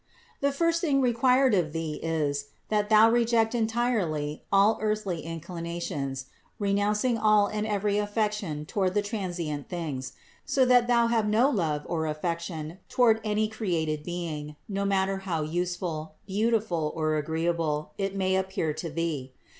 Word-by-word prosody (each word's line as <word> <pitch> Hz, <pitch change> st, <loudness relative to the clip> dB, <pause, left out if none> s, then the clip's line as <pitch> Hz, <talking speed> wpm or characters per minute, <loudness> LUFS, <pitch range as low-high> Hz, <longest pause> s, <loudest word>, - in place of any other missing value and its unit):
The 280 Hz, 0 st, +2 dB
first 335 Hz, +3 st, +1 dB
thing 285 Hz, -5 st, +2 dB
required 255 Hz, +1 st, +3 dB
of 170 Hz, -6 st, +1 dB
thee 165 Hz, -2 st, -3 dB
is, 145 Hz, -3 st, -1 dB, 0.2 s
that 210 Hz, -1 st, +1 dB
thou 220 Hz, 0 st, +7 dB
reject 235 Hz, -1 st, +3 dB
entirely 220 Hz, -11 st, 0 dB
all 200 Hz, +3 st, +4 dB
earthly 210 Hz, -6 st, -1 dB
inclinations, 165 Hz, -5 st, -4 dB, 0.3 s
renouncing 210 Hz, +3 st, +1 dB
all 215 Hz, -1 st, +5 dB
and 215 Hz, +1 st, -2 dB
every 205 Hz, 0 st, +1 dB
affection 205 Hz, -7 st, -1 dB
toward 185 Hz, +2 st, 0 dB
the 205 Hz, -, +2 dB
transient 175 Hz, -, -4 dB
things, 150 Hz, -7 st, -4 dB, 0.3 s
so 265 Hz, -2 st, +2 dB
that 245 Hz, -1 st, +5 dB
thou 235 Hz, -1 st, +4 dB
have 230 Hz, -2 st, +1 dB
no 235 Hz, +7 st, +4 dB
love 160 Hz, -, 0 dB
or 160 Hz, -2 st, -1 dB
affection 165 Hz, +1 st, -4 dB
toward 230 Hz, -3 st, +4 dB
any 215 Hz, 0 st, +1 dB
created 170 Hz, -9 st, -1 dB
being, 155 Hz, -3 st, -5 dB
no 200 Hz, -1 st, -2 dB
matter 195 Hz, 0 st, +1 dB
how 180 Hz, -5 st, -2 dB
useful, 165 Hz, -1 st, -3 dB
beautiful 205 Hz, -6 st, 0 dB
or 155 Hz, -1 st, 0 dB
agreeable 160 Hz, -1 st, -1 dB
it 195 Hz, 0 st, -1 dB
may 190 Hz, -1 st, +1 dB
appear 190 Hz, -5 st, -1 dB
to 165 Hz, +2 st, -5 dB
thee. 150 Hz, -5 st, -3 dB
190 Hz, 145 wpm, -27 LUFS, 160-215 Hz, 0.3 s, thou